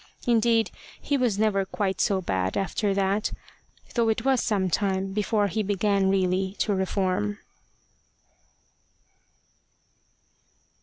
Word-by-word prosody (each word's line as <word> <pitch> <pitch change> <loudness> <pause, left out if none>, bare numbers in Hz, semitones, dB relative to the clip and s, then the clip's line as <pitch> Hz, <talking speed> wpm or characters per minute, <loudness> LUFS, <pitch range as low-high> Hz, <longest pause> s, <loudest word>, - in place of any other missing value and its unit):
Indeed, 230 -1 +3 0.3
he 285 - -1
was 245 -7 +1
never 210 -2 +2
quite 190 0 -2
so 195 -2 +1
bad 95 - -1
after 200 +1 0
that, 195 +2 0 0.6
though 230 -2 +2
it 225 +2 -1
was 265 -2 +3
some 200 -4 0
time 190 0 -1
before 210 0 +1
he 205 +3 -1
began 200 -1 +1
really 190 0 +1
to 210 - +1
reform. 185 - -1
200 Hz, 110 wpm, -26 LUFS, 190-220 Hz, 0.6 s, Indeed